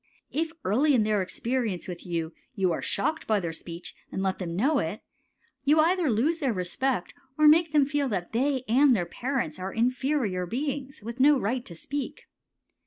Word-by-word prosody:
If 320 +2 -1
early 270 +9 +3
in 225 - +4
their 210 -2 +1
experience 225 0 -2
with 180 -1 -7
you 165 -1 -2 0.2
you 190 -4 +2
are - - -2
shocked 315 +11 -2
by 215 -2 +3
their 170 -3 -3
speech 170 +1 -7 0.2
and 190 - -2
let 190 -1 -1
them 170 -3 -4
know 275 - +2
it, 165 +4 -3 0.6
you 295 +3 +4
either 340 0 +3
lose 275 +10 +1
their 270 -7 +1
respect 185 +4 -1 0.2
or 305 0 +6
make 320 +1 +6
them 295 -2 +4
feel 285 -1 0
that 185 -5 -3
they 260 +2 +1
and 260 +3 +5
their 175 -5 0
parents 240 - -3
are 190 +1 -4
inferior 245 -6 0
beings 275 - -4
with 235 +3 -6
no 285 +1 +6
right 245 +4 -1
to 170 - -8
speak. 285 - -5
240 Hz, 185 wpm, -27 LUFS, 185-285 Hz, 0.6 s, or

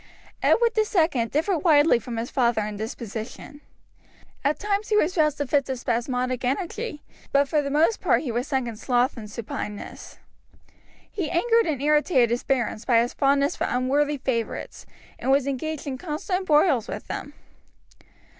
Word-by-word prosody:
Edward 470 0 +4
II 345 - +2
differed 325 - 0
widely 295 -5 +5
from 235 0 -6
his 230 +2 -4
father 235 -5 +2
in 210 0 -5
disposition. 225 +6 -7 0.8
At 285 +2 +1
times 415 +1 -2
he 425 - +3
was 365 -2 +2
roused 305 -3 +2
to 285 - -1
fits 280 0 +1
of 260 - -2
spasmodic 250 +1 -1
energy, 305 - -3 0.3
but 280 0 +3
for 300 +1 +1
the 280 - -3
most 315 +10 +2
part - - +2
he 260 - -3
was 240 +2 -2
sunk 265 -3 -1
in 225 -2 -6
sloth 250 +3 +1
and 215 -4 -8
supineness. 210 -1 -7 0.9
He 355 -7 -3
angered 455 +5 +2
and 300 -5 -1
irritated 295 -5 +3
his 240 - -1
barons 240 -4 -1
by 235 -2 +4
his 240 +1 0
fondness 280 +1 +2
for - - -1
unworthy 285 +4 +1
favourites, 245 -4 -3 0.3
and - - -3
was 275 0 +4
engaged 280 +3 -3
in 265 -3 -4
constant 365 +4 -3
broils 295 - +3
with - - -6
them. - - -6
275 Hz, 165 wpm, -25 LUFS, 245-315 Hz, 0.9 s, widely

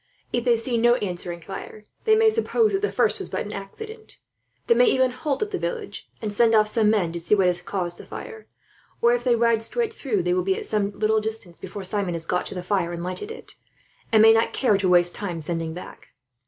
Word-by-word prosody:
If 240 0 0
they 240 -2 +4
see 235 +1 -1
no 240 +1 +4
answering 175 -5 -4
fire, 210 +4 -9 0.2
they 440 -1 +5
may 440 0 +5
suppose 450 -1 +1
that 390 - 0
the 420 - 0
first 450 - +1
was 385 - -4
but - - -3
an 210 - -7
accident. 435 - -8 0.5
They 470 - +5
may - - +5
even 260 - +3
halt 275 +6 -2
at 420 - -6
the - - -2
village, 460 -4 -5
and 210 -1 -2
send 225 +1 +4
off 215 -1 +5
some 215 -1 +2
men 200 -6 +1
to 170 - -4
see 170 +5 +3
what 195 -2 +2
has 175 -1 +1
caused 175 -2 -3
the - - -10
fire; 445 -2 -9 0.5
or 235 0 +4
if 245 0 -1
they 245 -2 +3
ride 230 -1 +2
straight 455 - -2
through, 220 - -1
they 180 0 +1
will 180 - +1
be 190 +1 0
at - - -5
some 210 -2 0
little 215 +2 +1
distance 215 -5 -6
before 200 - -7
Simon 190 -2 -1
has 165 -1 -5
got 180 +1 -1
to - - -8
the 180 - -5
fire 180 -3 0
and 170 0 -5
lighted 185 - -4
it, 455 +1 -10 0.6
and 220 -1 +6
may 225 0 +8
not 225 +1 +2
care 245 -6 +2
to 195 -1 +1
waste 175 -1 +4
time 180 -5 -4
sending 165 0 -4
back. 180 - -11
215 Hz, 245 wpm, -24 LUFS, 180-255 Hz, 0.6 s, may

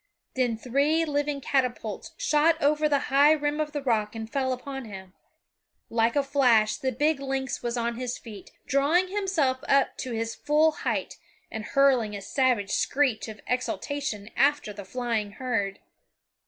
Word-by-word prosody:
Then 245 -3 +1
three 280 +7 +1
living 290 -1 -1
catapults 255 - -2
shot 310 +2 +3
over 300 0 +2
the 285 -1 +2
high 290 +3 +7
rim 295 0 -1
of 305 -1 -1
the 290 -2 -4
rock 220 -4 0
and 220 0 -5
fell 260 +2 -1
upon 270 +1 -5
him. 190 -3 -10 0.8
Like 230 +2 +2
a 285 - +3
flash 250 -6 +3
the 260 - -2
big 300 +2 +1
lynx 270 -1 -3
was 240 0 -2
on 235 0 -1
his 250 -1 -3
feet, 210 -5 -11 0.2
drawing 295 +8 +2
himself 370 -10 0
up 275 -1 +3
to 255 - -5
his 225 0 -2
full 300 +2 +3
height - - -3 0.3
and 220 - -5
hurling 255 -5 +2
a 200 - -6
savage 250 -7 +1
screech 260 -7 +1
of 215 -1 -9
exultation 250 -3 -3
after 285 -7 +2
the 200 -1 -9
flying 225 -2 -2
herd. 210 -5 -2
260 Hz, 160 wpm, -26 LUFS, 225-290 Hz, 0.8 s, high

